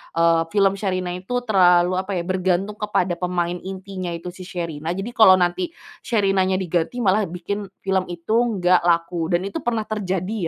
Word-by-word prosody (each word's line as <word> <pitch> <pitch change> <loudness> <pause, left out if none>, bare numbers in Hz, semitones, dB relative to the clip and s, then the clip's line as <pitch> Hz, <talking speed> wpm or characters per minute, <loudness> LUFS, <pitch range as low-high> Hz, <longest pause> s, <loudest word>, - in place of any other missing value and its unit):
eee, 165 0 +3
film 195 +1 +2
Sherina 185 -3 -2
itu 220 +8 -3
terlalu 180 -5 +4
apa, 190 0 -3
ya, 170 - -1
bergantung 185 +3 -1
kepada 185 -4 0
pemain 175 -1 -1
intinya 185 -2 -6
itu 175 +1 -7
si 185 0 -11
Sherina, 170 -2 -4
jadi 200 +5 -4
kalau 220 -6 +7
nanti 180 - 0 0.4
Sherinanya 195 -4 +2
diganti 185 +6 -1
malah 200 +1 +2
bikin 190 +4 -5 0.2
film 190 -1 0
itu 175 +3 -7
nggak 205 -6 +3
laku 170 -1 +1
dan 175 +2 0
itu 200 - -4
pernah 230 -2 -1
terjadi, 195 -2 -3
185 Hz, 165 wpm, -22 LUFS, 175-200 Hz, 0.4 s, kalau